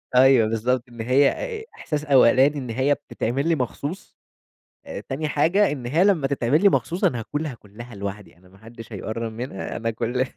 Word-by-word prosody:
أيوه 130 -3 +6
بالضبط، 120 +3 0
إن 120 -1 -8
هي 130 +4 +4
آآ، 460 -3 -5
إحساس 150 -1 -4
أولاني 135 +1 +5
إن 125 -4 -5
هي 130 +5 +2
بتتعمل 135 +2 -3
لي 165 - +3
مخصوص، 145 - -5 0.9
تاني 150 +3 -2
حاجة 175 +7 +3
إن 130 -5 -5
هي 160 +9 +2
لمّا 180 -9 +3
تتعمل 140 +2 +1
لي 200 - +8
مخصوص 175 0 -1
أنا 120 - +2
هاكلها 145 +4 -4
كلّها 115 +2 -12
لوحدي، 100 -2 -7
أنا 90 +1 -21
ما 95 - -19
حدش 115 +2 -12
هيقرّب 110 +3 -4
منها 115 -4 -5
أنا 115 0 -2
كُلّ 120 +3 -1
130 Hz, 180 wpm, -23 LUFS, 115-145 Hz, 0.9 s, لي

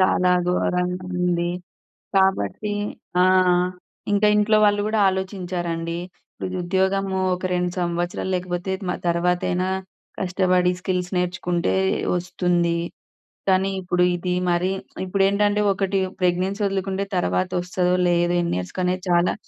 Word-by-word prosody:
చాలా 185 -1 +3 0.2
ఘోరంగా 180 0 0
ఉంది. 175 -1 +1 0.7
కాబట్టి 190 - +1 0.5
ఆ! - - +6 0.9
ఇంకా 210 +1 +4
ఇంట్లో 210 +1 +4
వాళ్ళు 205 0 +3
కూడా 220 0 0
ఆలోచించారండి 175 -3 -3 0.4
"ఇప్పుడు 185 0 -5
ఉద్యోగము 190 +1 0 0.2
ఒక 185 - -6
2 180 0 0
సంవత్సరాలు 175 +2 -2
లేకపోతే 180 +1 -3 0.2
మ - - +1 0.2
తర్వాతైనా 180 +1 +1 0.5
కష్టపడి 180 -1 +2
స్కిల్స్ 180 -1 -2
నేర్చుకుంటే 175 - 0 0.4
వస్తుంది. 175 -1 0 0.7
కానీ 190 +1 +3
ఇప్పుడు 180 0 +1
ఇది 180 +1 -2 0.2
మరి 175 +2 +1 0.3
ఇప్పుడేంటంటే 200 +2 +2
ఒకటి 195 0 -1 0.2
ప్రెగ్నెన్సీ 185 +3 +1
వదులుకుంటే 195 0 -1
తర్వాత 180 +1 0
ఒస్తాదో? 180 0 0
లేదో? 175 0 +2
ఎన్ని 170 - -1
ఇయర్స్‌కనేది 180 - -2
చాలా" 175 +1 +3
180 Hz, 110 wpm, -23 LUFS, 175-190 Hz, 0.9 s, ఆ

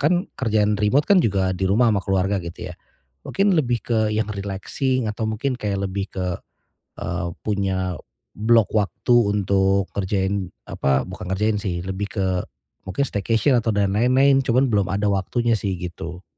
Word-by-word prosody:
kan 150 +5 +3 0.2
kerjaan 105 -3 +1
remote 130 +8 +3
kan 195 +1 +5
juga 95 - +1
di 95 - -2
rumah 115 +3 +4
ama 100 - +1
keluarga, 95 0 0
gitu 85 +1 -7
ya. - - -13 0.5
Mungkin 195 0 +2
lebih 120 -6 +1
ke 115 -2 +1
yang 110 +1 0
relaxing 105 +6 -2
atau 110 +1 -4
mungkin 125 +5 -1
kayak 100 -5 -2
lebih 95 +1 -4
ke 95 -1 -3 0.7
e - - -5 0.4
punya 95 -3 -1 0.4
blok 110 +1 +3
waktu 110 +3 +1 0.2
untuk 95 -1 +1
ngerjain, 95 0 -1 0.2
apa? 65 -1 +1
Bukan 95 0 -8
ngerjain 105 +2 +1
sih, 90 -4 -3
lebih 95 +2 -3
ke 95 -2 0 0.6
mungkin 140 +9 0
staycation 115 +5 +1
atau 115 0 0
dan 100 -1 +2
lain-lain. 130 +4 +4
Cuman 130 +2 +3
belum 100 -3 +2
ada 100 +2 0
waktunya 115 +5 0
sih, 95 -2 -2
gitu. 90 0 -7
100 Hz, 160 wpm, -22 LUFS, 95-115 Hz, 0.7 s, kan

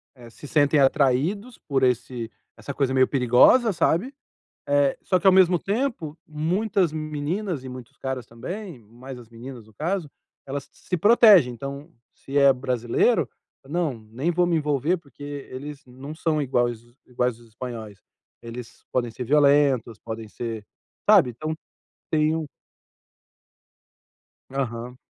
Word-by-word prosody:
eh, 120 -2 -13
se 130 +6 -12
sentem 145 -1 +3
atraídos 150 - +1
por 135 -2 -1
esse 125 -2 0 0.3
essa 140 - -6
coisa 135 -1 0
meio 130 0 +4
perigosa, 135 - +5
sabe, 175 - +1 0.5
eh, 145 -1 +2
só 185 - +2
que, 180 - +1
ao 190 - +8
mesmo 180 -2 +5
tempo, 200 - -2
muitas 180 +4 0
meninas 155 +2 -3
e 130 - -7
muitos 125 -2 -10
caras 130 -2 -4
também, 170 - -7
mais 120 +4 -11
as 115 -2 -14
meninas, 115 -1 -10
no 110 - -20
caso, 165 - -2 0.4
elas 140 0 -5
se 180 - -4
protegem. 205 - +6
Então, 140 +6 -7 0.2
se 135 - -9
é 140 -1 +7
brasileiro: 125 - +1 0.4
"Não. 165 -2 -1 0.2
Nem 135 +10 -1
vou 175 +1 +2
me 175 - +1
envolver, 150 +3 +1
porque 145 -3 -15 0.3
eles 145 +3 -8
não 130 +4 -9
são 155 -2 0
iguais 120 -4 0 0.3
iguais 125 -1 -1
aos 120 - -18
espanhóis. 110 -3 -7 0.5
Eles 115 0 -9
podem 120 -2 0
ser 125 - -6
violentos 140 -5 +3
podem 110 -1 -7
ser 115 -2 -6 0.4
sabe?” 190 -11 +7
Então 155 +7 -4 0.6
têm 155 0 +2
um 155 -2 -4 2.0
Aham. 125 -2 -4
140 Hz, 140 wpm, -24 LUFS, 125-165 Hz, 2.0 s, ao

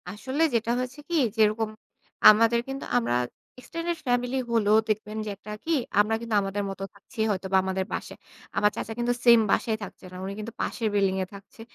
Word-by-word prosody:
আসলে 260 - -4
যেটা 230 0 +1
হয়েছে 255 +3 -4
কি 345 - 0 0.2
যেরকম 215 0 +3 0.6
আমাদের 230 +2 +5
কিন্তু 270 0 -5
আমরা 120 0 +1 0.4
এক্সটেন্ডেড 335 +5 -4
ফ্যামিলি 245 +1 +1
হলেও 215 -2 +4
দেখবেন 215 0 -2
যে - - -4
একটা 210 - -10
কি 330 - +1 0.3
আমরা 210 +2 +3
কিন্তু 230 -2 -2
আমাদের 195 +1 -2
মতো 195 0 -6
থাকছি 210 +4 -16
হয়তো 190 -2 -1
বা - - +7
আমাদের 190 0 -1
বাসায়। - - -5 0.4
আমার 210 0 +4
চাচা 225 - -4
কিন্তু 240 0 +1
সেম 235 -1 +8
বাসায় 220 -2 +1
থাকছে 200 - -10
না। - - -10
উনি 195 - -4
কিন্তু 215 +1 -6
পাশের 230 - -1
বিল্ডিং 195 -2 +2
এ - - -4
থাকছে। 200 +3 -14
220 Hz, 190 wpm, -26 LUFS, 200-240 Hz, 0.6 s, সেম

